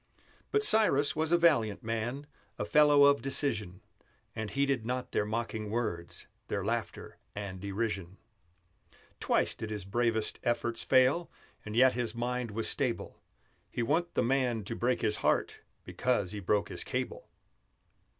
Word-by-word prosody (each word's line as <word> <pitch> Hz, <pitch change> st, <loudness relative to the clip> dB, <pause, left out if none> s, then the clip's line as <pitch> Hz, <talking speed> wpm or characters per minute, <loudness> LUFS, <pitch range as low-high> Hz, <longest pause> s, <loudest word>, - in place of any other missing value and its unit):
But 425 Hz, 0 st, +1 dB
Cyrus 205 Hz, -, +6 dB
was 160 Hz, +1 st, 0 dB
a 175 Hz, -, +5 dB
valiant 115 Hz, -12 st, +2 dB
man, 115 Hz, +5 st, -3 dB, 0.3 s
A -, -, -3 dB
fellow 150 Hz, -1 st, +5 dB
of 140 Hz, -2 st, +5 dB
decision; 115 Hz, -9 st, +1 dB, 0.5 s
And 110 Hz, -1 st, -4 dB
heeded 140 Hz, -1 st, 0 dB
not 125 Hz, +2 st, -4 dB
their 105 Hz, -, 0 dB
mocking 110 Hz, -1 st, -3 dB
words, 85 Hz, -7 st, -4 dB, 0.2 s
Their 100 Hz, -1 st, -3 dB
laughter 115 Hz, 0 st, -4 dB, 0.2 s
and 100 Hz, -3 st, -6 dB
derision. 100 Hz, -2 st, -4 dB, 1.0 s
Twice -, -, +1 dB
did 110 Hz, -, -7 dB
his 105 Hz, -3 st, -5 dB
bravest 110 Hz, +1 st, -1 dB
efforts 120 Hz, -1 st, -1 dB
fail, 130 Hz, +6 st, +3 dB, 0.3 s
And 105 Hz, 0 st, -7 dB
yet 130 Hz, +2 st, +6 dB
his 120 Hz, -1 st, -3 dB
mind 125 Hz, 0 st, -2 dB
was 110 Hz, +2 st, -2 dB
stable; 130 Hz, -5 st, -2 dB, 0.5 s
He 120 Hz, -, -3 dB
wa'n't 165 Hz, +7 st, -1 dB
the -, -, +2 dB
man 125 Hz, -3 st, 0 dB
to 115 Hz, +4 st, -5 dB
break 125 Hz, +1 st, -1 dB
his 105 Hz, -1 st, +1 dB
heart -, -, 0 dB, 0.2 s
Because 120 Hz, -8 st, -1 dB
he 105 Hz, -, -5 dB
broke 100 Hz, +1 st, 0 dB
his -, -, -4 dB
cable. -, -, -5 dB
120 Hz, 150 wpm, -30 LUFS, 105-135 Hz, 1.0 s, Cyrus